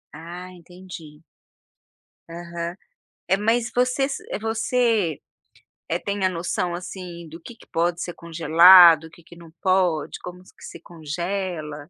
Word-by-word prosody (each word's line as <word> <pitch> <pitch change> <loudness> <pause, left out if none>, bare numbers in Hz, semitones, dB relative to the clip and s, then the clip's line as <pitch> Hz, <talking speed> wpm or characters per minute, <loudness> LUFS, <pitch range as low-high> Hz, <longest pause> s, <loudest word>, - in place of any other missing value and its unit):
Ah, 175 +3 -9
entendi. 175 -3 -13 1.1
Aham. 170 0 -6 0.5
É, 190 +2 +2
mas 230 +3 0
você 250 +2 +1
se 275 - -6 0.2
você, 225 - 0 0.7
eh, 170 +2 -1
tem 200 -1 -3
a - - +3
noção 175 0 -3
assim 175 -1 -8
do 165 +2 -11
que 235 - -11
que - - -20
pode 170 +1 -1
ser 175 - -5
congelado, 170 0 +6
o - - -12
que 170 +1 -19
que 170 - -16
não 170 -1 -15
pode, 185 -5 +1
como 180 0 -9
que 185 - -20
se - - -10
congela, 165 -2 -5
175 Hz, 140 wpm, -23 LUFS, 165-190 Hz, 1.1 s, congelado